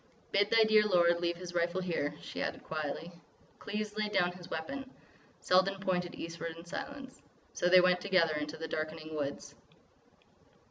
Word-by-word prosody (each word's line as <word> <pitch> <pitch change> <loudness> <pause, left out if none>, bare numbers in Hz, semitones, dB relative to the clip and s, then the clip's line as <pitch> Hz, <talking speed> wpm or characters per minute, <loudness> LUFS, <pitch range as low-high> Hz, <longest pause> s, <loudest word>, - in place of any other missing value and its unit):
"Bid 200 +1 +3
thy 225 -1 +6
dear 215 -1 +5
lord 175 -4 +4
leave 170 0 -1
his 175 0 -8
rifle 175 +1 +1
here," 165 -5 -1
she - - -5
added - - -3
quietly. 155 +2 -4 0.5
Cleves 210 0 -4
laid 215 -1 -1
down 180 -3 +2
his 180 -1 -12
weapon. 260 +13 -5 0.5
Selden 190 +2 +3
pointed 180 -2 -1
eastward 165 0 -6
in 165 - -11
silence. 265 +8 -7 0.3
So 180 - +1
they 185 0 +8
went 180 0 +3
together 185 -5 +3
into 150 +1 -3
the 160 0 -5
darkening 155 0 -4
woods. 145 -2 -4
175 Hz, 165 wpm, -32 LUFS, 165-195 Hz, 0.5 s, they